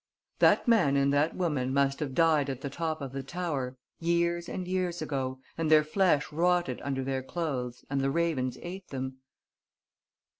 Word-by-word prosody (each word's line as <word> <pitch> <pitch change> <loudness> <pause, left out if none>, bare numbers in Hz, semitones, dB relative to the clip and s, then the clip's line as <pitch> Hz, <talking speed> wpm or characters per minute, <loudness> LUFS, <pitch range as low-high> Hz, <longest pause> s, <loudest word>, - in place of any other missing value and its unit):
"That - - +5
man 175 -13 +4
and 140 0 +3
that 145 +3 +2
woman 150 -8 0
must 140 0 +2
have 140 -4 -3
died 155 -4 +3
at 135 -1 -4
the 140 - -4
top 160 0 -3
of 135 -2 -5
the 135 0 -4
tower, 135 -4 -3 0.2
years 170 0 +1
and 180 -1 -4
years 180 -2 -1
ago... 135 -4 -3 0.2
and 160 -1 0
their 155 -1 +7
flesh 155 -2 +2
rotted 175 -4 +1
under 135 -1 -2
their 135 0 -1
clothes 130 -5 -4
and 135 0 -1
the 135 - +1
ravens 140 -5 0
ate 185 +2 -7
them." 130 -1 -5
150 Hz, 175 wpm, -29 LUFS, 135-170 Hz, 0.2 s, their